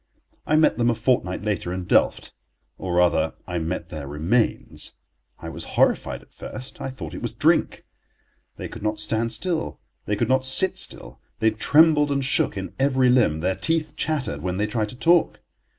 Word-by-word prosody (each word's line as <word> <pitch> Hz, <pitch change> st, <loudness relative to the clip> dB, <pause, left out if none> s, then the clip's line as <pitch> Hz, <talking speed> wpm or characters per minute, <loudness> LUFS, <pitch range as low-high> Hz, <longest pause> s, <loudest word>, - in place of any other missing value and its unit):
I 155 Hz, -, +3 dB
met 155 Hz, -4 st, +3 dB
them 120 Hz, 0 st, +3 dB
a 120 Hz, -, +1 dB
fortnight 110 Hz, -5 st, 0 dB
later 100 Hz, -4 st, -2 dB
in 90 Hz, 0 st, -3 dB
Delft, -, -, +1 dB, 0.5 s
or, 90 Hz, -2 st, -3 dB
rather, 85 Hz, -3 st, +2 dB
I 90 Hz, -1 st, -3 dB
met 85 Hz, +1 st, -4 dB
their 75 Hz, -5 st, -6 dB
remains. 85 Hz, -, -1 dB, 0.4 s
I -, -, -8 dB
was -, -, -7 dB
horrified -, -, +2 dB
at -, -, -25 dB
first. 130 Hz, 0 st, -8 dB
I -, -, -3 dB
thought 130 Hz, -, -8 dB
it -, -, -7 dB
was -, -, -3 dB
drink. -, -, +2 dB, 0.7 s
They -, -, -5 dB
could -, -, -10 dB
not 105 Hz, 0 st, -1 dB
stand 110 Hz, +2 st, 0 dB
still, 165 Hz, +8 st, -1 dB, 0.3 s
they 105 Hz, -, +1 dB
could 115 Hz, +2 st, 0 dB
not 130 Hz, +1 st, +2 dB
sit 130 Hz, +8 st, +2 dB
still, -, -, -5 dB, 0.2 s
they 110 Hz, 0 st, +2 dB
trembled 150 Hz, +6 st, +4 dB
and 140 Hz, -1 st, 0 dB
shook 130 Hz, -, +1 dB
in 95 Hz, -1 st, -5 dB
every 130 Hz, -2 st, +3 dB
limb, 110 Hz, -12 st, +3 dB
their 95 Hz, +2 st, +1 dB
teeth 155 Hz, -, -1 dB
chattered 135 Hz, -, -2 dB
when 90 Hz, +2 st, -2 dB
they 105 Hz, -, +1 dB
tried 105 Hz, 0 st, -2 dB
to 125 Hz, -, -9 dB
talk. 170 Hz, +6 st, +3 dB
110 Hz, 185 wpm, -23 LUFS, 90-135 Hz, 0.7 s, trembled